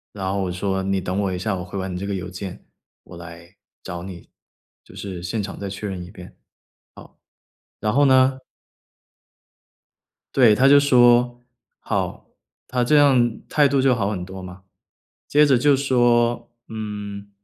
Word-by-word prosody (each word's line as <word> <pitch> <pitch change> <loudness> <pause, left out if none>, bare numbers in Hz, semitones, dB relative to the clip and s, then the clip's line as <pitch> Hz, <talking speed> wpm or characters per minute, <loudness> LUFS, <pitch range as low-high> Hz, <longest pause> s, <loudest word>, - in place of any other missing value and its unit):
然 95 -2 -5
后 100 - -1
我 90 - -3
说： 95 +1 -2
“你 95 0 0
等 95 +2 -3
我 95 -2 -1
一 90 - -4
下， 100 +1 -2
我 90 - -5
回 90 +2 -8
完 95 -1 -4
你 - - -4
这 95 - -5
个 100 - -3
邮 95 -1 -5
件， 95 0 -8 0.4
我 90 - -13
来 85 +2 -12 0.3
找 85 0 -7
你， 90 -2 -10 0.5
就 - - -17
是 95 -3 -7
现 100 +5 -3
场 95 -1 -7
再 100 - -5
确 100 +2 -6
认 95 -2 -5
一 90 - -12
遍。 90 -2 -12
好。 - - -26 1.5
“然 105 0 0
后 145 +2 +4
呢 130 0 +4 2.0
对， 120 -5 +5
他 130 +5 +4
就 145 +1 +7
说： 120 -3 +4 0.4
“好。” - - -4 0.4
他 125 -1 -1
这 150 - +3
样 130 -6 +3
态 150 -2 +4
度 140 -1 +1
就 135 -1 +3
好 100 -5 -1
很 90 -4 -4
多 95 +1 -9
嘛， 90 0 -11 0.7
接 150 +1 +4
着 135 -3 +4
就 140 +3 +3
说， 120 -3 +1 0.2
嗯 105 -2 -7
100 Hz, 185 characters per minute, -22 LUFS, 95-125 Hz, 2.0 s, 就